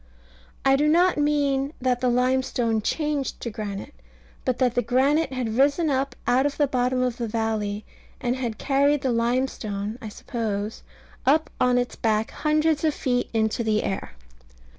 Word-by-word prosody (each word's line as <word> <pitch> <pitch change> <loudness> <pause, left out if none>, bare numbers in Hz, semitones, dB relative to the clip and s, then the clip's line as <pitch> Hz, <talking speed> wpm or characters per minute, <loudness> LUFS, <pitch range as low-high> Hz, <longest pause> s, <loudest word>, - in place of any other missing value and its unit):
I 270 0 +6
do 295 +2 +2
not 345 +1 +4
mean 285 -1 +1
that 250 -1 0
the 250 - +2
limestone 250 -2 +1
changed 295 +2 -1
to 235 - -4
granite, 205 -2 -6 0.5
but 255 -1 0
that 250 -2 +2
the 245 - +2
granite 270 +6 +2
had 245 -4 -2
risen 290 +3 +3
up 270 +1 -1
out 260 +3 +3
of 285 - -5
the 295 - +4
bottom 255 -1 0
of 250 -2 -1
the 235 - -2
valley, 215 -2 -2 0.3
and 245 0 0
had 240 -4 -3
carried 280 +1 +2
the 260 - +1
limestone 230 -3 -1
(I 220 - -6
suppose) 210 -1 -4 0.4
up 310 +4 +3
on 250 -1 +4
its 245 0 -1
back 220 -1 0
hundreds 305 0 +1
of 310 -2 +2
feet 245 -2 0
into 220 +1 0
the 215 -1 +1
air. 190 - -3
250 Hz, 165 wpm, -25 LUFS, 225-280 Hz, 0.5 s, I